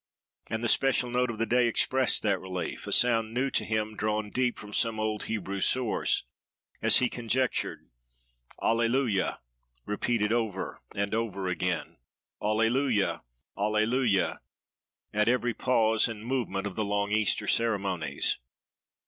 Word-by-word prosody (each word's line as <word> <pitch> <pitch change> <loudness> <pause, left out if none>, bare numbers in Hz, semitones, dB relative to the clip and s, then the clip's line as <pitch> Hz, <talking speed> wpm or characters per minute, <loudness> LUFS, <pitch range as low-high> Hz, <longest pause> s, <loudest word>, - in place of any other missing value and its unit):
And 110 +1 -3
the - - +1
special 125 0 +3
note 125 0 +1
of 115 - -4
the 115 - 0
day 120 +2 +3
expressed 130 +2 +2
that 100 -3 +1
relief—a 95 -1 -5
sound 115 -2 +3
new 135 +2 0
to - - +1
him, 110 -1 -2
drawn 105 0 -2
deep 125 -1 0
from 105 0 -10
some 115 0 +1
old 110 -1 -2
Hebrew 100 -3 -3
source, 125 0 +2 0.6
as - - +5
he 125 - +3
conjectured, 120 +2 -2 0.8
Alleluia! 115 -2 +1 0.4
repeated 105 +1 0
over 110 -5 -2
and 100 +1 -1
over 100 -4 -2
again, 90 0 -2 0.4
Alleluia! 115 +1 +1 0.3
Alleluia! 110 +1 +1 0.7
at 105 +1 +2
every 120 -1 +1
pause 110 -3 +3
and 110 -2 -7
movement 115 -6 -2
of 100 - -5
the 110 - -1
long 100 0 -1
Easter 105 -3 +2
ceremonies. 100 -6 +1
110 Hz, 130 wpm, -28 LUFS, 105-120 Hz, 0.8 s, as